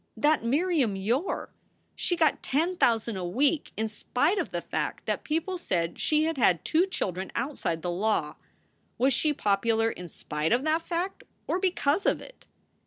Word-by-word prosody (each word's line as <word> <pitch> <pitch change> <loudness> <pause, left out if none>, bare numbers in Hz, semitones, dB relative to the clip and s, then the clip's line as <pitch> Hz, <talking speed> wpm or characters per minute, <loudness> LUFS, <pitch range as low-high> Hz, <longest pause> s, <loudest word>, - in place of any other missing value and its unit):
That 300 -3 +3
Miriam 280 - +2
Yore! 235 - -1 0.4
She 350 - +1
got 325 -2 +2
ten 330 +7 0
thousand 230 - +2
a 185 - -4
week 275 - +1
in 220 +1 0
spite 285 - 0
of - - -2
the - - -2
fact - - -4
that - - -1
people 330 +4 -2
said 170 - -1
she 305 0 +2
had 320 -3 -1
had 180 -7 +3
two 345 +4 +3
children 190 - -3
outside 235 - -2
the 175 - -1
law! 210 +5 0 0.6
Was 265 +2 +3
she 300 +4 +2
popular 225 -1 +1
in 180 -1 -8
spite 150 +4 -2
of 250 +3 +2
that 315 +2 +1
fact? 345 +3 -3 0.2
or 360 - 0
because 365 -2 +1
of - - +2
it? - - -13
270 Hz, 175 wpm, -28 LUFS, 205-325 Hz, 0.6 s, That